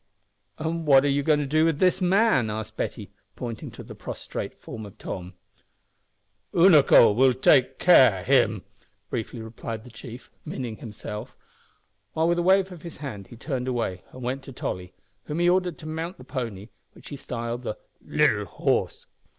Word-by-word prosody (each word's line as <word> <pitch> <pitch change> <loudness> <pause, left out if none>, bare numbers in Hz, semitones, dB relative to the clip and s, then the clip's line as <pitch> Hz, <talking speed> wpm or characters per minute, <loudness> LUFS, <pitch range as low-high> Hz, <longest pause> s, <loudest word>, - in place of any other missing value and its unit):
"And 160 0 -3
what 135 -1 +6
are - - +3
you 140 +1 +2
going 150 0 +2
to - - -2
do 155 +3 +2
with 165 -3 +2
this 185 +3 +2
man?" 185 - +3
asked 110 0 -5
Betty, - - -4 0.2
pointing 115 -3 -6
to - - -11
the - - -10
prostrate - - -6
form 110 - -9
of 100 -2 -11
Tom. 90 0 -7 1.2
"Unaco 155 - +7
will 130 +5 +5
him 125 0 -2
take 135 -1 +4
care," 115 - +5 0.5
briefly 115 0 -4
replied 110 0 -7
the 125 - -13
chief 120 +2 -11
(meaning 120 -4 -5
himself), 105 -2 -8 0.8
while 160 +1 +1
with 175 0 +2
a - - +2
wave 190 +1 +3
of 175 -3 -10
his 170 -2 -9
hand 110 -10 -7
he - - -12
turned 130 -1 -3
away, 115 -7 -2
and 130 - -10
went 130 +3 -2
to 135 - -11
Tolly, 90 -7 -5 0.3
whom 150 - -4
he 175 0 +2
ordered 180 -1 +2
to 155 - -12
mount 165 +3 -4
the - - -12
pony, 115 -6 -5 0.2
which - - -13
he 145 - -6
styled 120 -2 -5
the 120 - -4 0.3
"littil - - +2
horse." - - -1
130 Hz, 175 wpm, -25 LUFS, 115-160 Hz, 1.2 s, Unaco